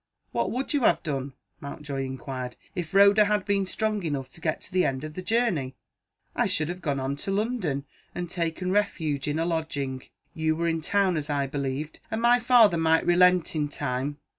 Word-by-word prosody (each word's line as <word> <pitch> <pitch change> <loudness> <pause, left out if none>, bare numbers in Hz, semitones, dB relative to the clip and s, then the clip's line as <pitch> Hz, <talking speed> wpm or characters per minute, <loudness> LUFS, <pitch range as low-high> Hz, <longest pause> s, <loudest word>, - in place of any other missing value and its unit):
"What - - 0
would 260 +4 -2
you 290 - +3
have - - +3
done," 140 -4 -3 0.3
Mountjoy 140 -2 -5
inquired, 130 -1 -5 0.2
"if 175 -5 -4
Rhoda 200 +2 +6
had 210 -2 0
been 200 -1 +1
strong 215 +1 -1
enough 140 -6 -3
to 165 - -13
get 155 -1 -1
to - - -9
the 185 0 +3
end 130 0 -1
of 155 0 -6
the 185 - -5
journey?" 185 - 0 0.6
"I - - +2
should 155 +1 0
have 180 +1 -5
gone 140 -4 -1
on 135 +1 -2
to 170 - -5
London, 195 - -1 0.3
and 175 0 -3
taken 170 +1 -2
refuge 160 -9 0
in 145 +1 0
a 165 - 0
lodging 145 -6 -2 0.3
you 160 0 0
were 170 +1 -1
in 165 -1 0
town, 190 +1 +2
as 150 0 -4
I 140 -1 +1
believed, 140 +2 -4
and 220 0 -2
my 240 +1 +5
father 230 -6 +5
might 160 0 +3
relent 180 0 +4
in 150 -1 0
time. 145 0 -3
160 Hz, 200 wpm, -26 LUFS, 140-195 Hz, 0.6 s, Rhoda